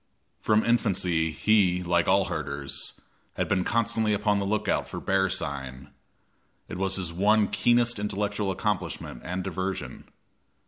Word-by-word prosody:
From 110 0 +2
infancy 90 -8 +1
he, 90 0 +2
like 85 -1 +1
all 95 +1 +4
the 95 - -6
herders, 70 -4 -4 0.4
had - - -1
been 95 -1 +1
constantly 110 -1 +1
upon 105 0 +1
the 100 - -2
lookout 105 +1 0
for - - -5
bear 95 0 +1
sign; 70 -2 -4 0.8
it - - -6
was 95 0 0
his 90 -3 -3
one 105 +4 +3
keenest 120 0 +2
intellectual 105 0 -2
accomplishment 95 - -3
and 95 +2 -3
diversion. 95 +1 -4
95 Hz, 140 wpm, -27 LUFS, 85-105 Hz, 0.8 s, all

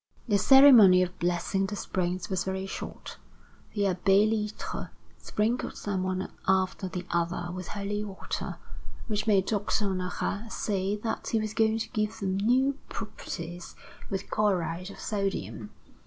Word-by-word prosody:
The 205 -3 +3
ceremony 235 -9 +8
of 180 0 -6
blessing 180 +3 0
the 205 - -4
springs 185 -2 -2
was 190 -2 -1
very 190 0 -3
short. 195 - -7 0.6
The 205 - 0
Abbé 195 +2 +4
Litre 215 -1 -3 0.3
sprinkled 225 +4 -1
them 200 -2 -2
one 185 0 -1 0.2
after 190 0 +1
the 180 0 -5
other 175 0 -1
with 185 -2 -6
holy 205 +1 -3
water, 195 -2 -5 0.5
which 210 -1 -2
made 195 -3 +4
Doctor 205 0 0
Honorat 190 +4 -3
say 195 -1 -1
that 220 +2 -4
he 225 - +1
was 215 -1 -3
going 220 0 +2
to 225 - -3
give 215 +1 -2
them 190 -2 -1
new 260 +7 +2
properties 175 -5 -7 0.3
with 195 - -4
chloride 185 -4 0
of 200 - -11
sodium. 115 - -3
195 Hz, 145 wpm, -28 LUFS, 185-210 Hz, 0.6 s, ceremony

